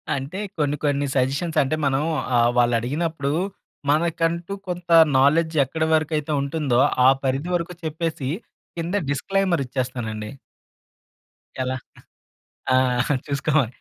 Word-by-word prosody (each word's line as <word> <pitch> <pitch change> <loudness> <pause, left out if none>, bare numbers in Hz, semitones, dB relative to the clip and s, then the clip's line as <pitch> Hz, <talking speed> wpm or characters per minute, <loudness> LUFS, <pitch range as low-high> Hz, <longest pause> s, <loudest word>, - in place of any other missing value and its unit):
అంటే 140 +8 -5 0.2
కొన్ని 145 -2 +1
కొన్ని 145 -1 +1
సజెషన్స్ 140 +6 0
అంటే 135 +3 -1
మనం 135 +1 +1 0.3
ఆహ్, 120 0 +4
వాళ్ళడిగినప్పుడు 140 +6 +1 0.6
మనకంటూ 165 +3 0
కొంత 175 -1 -5 0.3
నాలెడ్జ్ 160 +4 +3
ఎక్కడ 160 +5 -3
వరకైతే 155 -1 0
ఉంటుందో 140 -3 0 0.3
ఆ - - +9
పరిధి 135 +5 -1
వరకు 175 +1 -2
చెప్పేసి 160 -3 -3 0.5
కింద 170 +3 -2
డిస్‌క్లైమర్ 175 +4 0
ఇచ్చేస్తానండి. 120 -4 -4 1.3
ఎలా? 130 0 -1 1.0
ఆ! - - +4 0.5
చూసుకోమని. 140 -3 +1
145 Hz, 105 wpm, -23 LUFS, 130-165 Hz, 1.3 s, ఆ